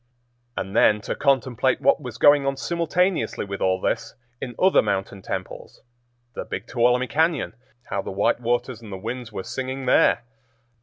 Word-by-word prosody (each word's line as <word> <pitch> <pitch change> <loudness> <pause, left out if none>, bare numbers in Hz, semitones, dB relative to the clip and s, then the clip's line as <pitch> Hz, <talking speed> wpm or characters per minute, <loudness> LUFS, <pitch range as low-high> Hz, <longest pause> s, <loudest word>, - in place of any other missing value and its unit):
And 95 +2 -4
then 105 -2 +5
to - - -3
contemplate 130 -2 +1
what - - +3
was 125 -4 -7
going 145 0 +5
on 135 0 -1
simultaneously 170 - 0
with 100 0 -6
all 95 0 +2
this 115 +4 -2 0.3
in 125 -2 -5
other 190 +1 +5
mountain 95 0 -2
temples; - - -6 0.5
the - - -5
Big - - -6
Tuolumne 125 +1 +2
Cañon—how 130 - -2
the - - -7
white 100 +4 +1
waters 120 0 -1
and 110 -3 -11
the 95 - -5
winds 115 +4 -6
were 95 - -5
singing 130 +3 -4
there! 125 - +4
125 Hz, 160 wpm, -24 LUFS, 110-135 Hz, 0.5 s, then